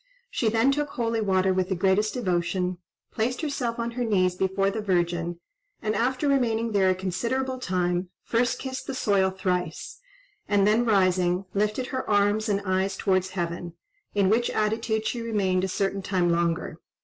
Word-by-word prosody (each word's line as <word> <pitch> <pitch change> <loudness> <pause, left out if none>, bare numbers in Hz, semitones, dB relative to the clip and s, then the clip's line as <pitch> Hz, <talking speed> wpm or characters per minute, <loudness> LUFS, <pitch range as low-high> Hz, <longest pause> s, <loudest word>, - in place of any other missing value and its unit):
She 225 - +1
then 230 +5 +3
took 295 +1 -1
holy 230 -4 -1
water 190 -2 +2
with 185 0 0
the 190 - 0
greatest 195 +5 +2
devotion, 180 -4 -1 0.3
placed 245 +5 -1
herself 260 -6 -2
on 235 0 -2
her 245 +1 -2
knees 185 -5 +2
before 190 +2 0
the 220 - -3
Virgin, 175 -3 0 0.4
and 215 -1 -1
after 255 +5 0
remaining 230 -5 +1
there 195 -2 +3
a 185 - +2
considerable 235 +8 -2
time, 180 -4 -1
first 240 +1 +1
kissed 260 -1 -6
the 270 - -3
soil 200 -5 +2
thrice, 180 - -3 0.5
and 205 -1 +3
then 220 +3 +3
rising, 185 -3 +2
lifted 210 +5 0
her 260 - -3
arms 205 +1 +2
and 200 -1 0
eyes 190 +1 0
towards 185 -1 +1
heaven, 170 0 -3 0.4
in 200 -2 +3
which 230 +4 +2
attitude 220 +1 0
she 240 - -2
remained 195 -5 0
a - - +1
certain 195 +1 -1
time 185 -2 +1
longer. 170 -1 -1
200 Hz, 170 wpm, -26 LUFS, 185-230 Hz, 0.5 s, then